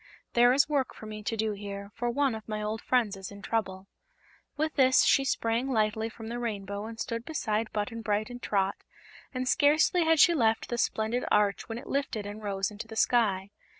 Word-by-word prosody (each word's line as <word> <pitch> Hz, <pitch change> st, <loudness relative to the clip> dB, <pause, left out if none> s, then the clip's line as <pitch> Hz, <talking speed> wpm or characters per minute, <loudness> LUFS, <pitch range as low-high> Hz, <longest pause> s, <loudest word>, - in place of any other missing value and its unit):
"There 240 Hz, +1 st, +6 dB
is 270 Hz, +2 st, +4 dB
work 285 Hz, -3 st, -1 dB
for -, -, -10 dB
me 215 Hz, 0 st, -7 dB
to 225 Hz, +2 st, -3 dB
do 220 Hz, 0 st, 0 dB
here, 200 Hz, 0 st, -7 dB
for 240 Hz, +1 st, -2 dB
one 275 Hz, +1 st, +1 dB
of 220 Hz, 0 st, -8 dB
my 215 Hz, 0 st, -2 dB
old 215 Hz, +1 st, -3 dB
friends 235 Hz, -6 st, +1 dB
is 190 Hz, -1 st, -8 dB
in 200 Hz, 0 st, -12 dB
trouble." 195 Hz, -4 st, -2 dB, 0.7 s
With 310 Hz, +1 st, 0 dB
this 260 Hz, -2 st, +5 dB
she 275 Hz, -, +4 dB
sprang 240 Hz, -1 st, 0 dB
lightly 220 Hz, -2 st, 0 dB
from 225 Hz, 0 st, -11 dB
the 240 Hz, +1 st, -4 dB
rainbow 205 Hz, -3 st, -4 dB
and 225 Hz, 0 st, -9 dB
stood 230 Hz, -2 st, -3 dB
beside 220 Hz, -7 st, -2 dB
Button 220 Hz, +2 st, -3 dB
Bright 215 Hz, +1 st, -1 dB
and 245 Hz, 0 st, -8 dB
Trot, 195 Hz, -1 st, 0 dB, 0.5 s
and 255 Hz, -1 st, -3 dB
scarcely 310 Hz, +5 st, +4 dB
had 320 Hz, -1 st, +3 dB
she 345 Hz, -, +7 dB
left 225 Hz, -7 st, +1 dB
the 240 Hz, -, -2 dB
splendid 225 Hz, +3 st, 0 dB
arch 205 Hz, +1 st, +2 dB
when 225 Hz, -, -4 dB
it 240 Hz, -, -8 dB
lifted 275 Hz, -7 st, -2 dB
and 205 Hz, +1 st, -7 dB
rose 195 Hz, -1 st, -2 dB
into 210 Hz, +2 st, -8 dB
the 220 Hz, -, -9 dB
sky. 205 Hz, -5 st, +2 dB
225 Hz, 210 wpm, -29 LUFS, 210-250 Hz, 0.7 s, she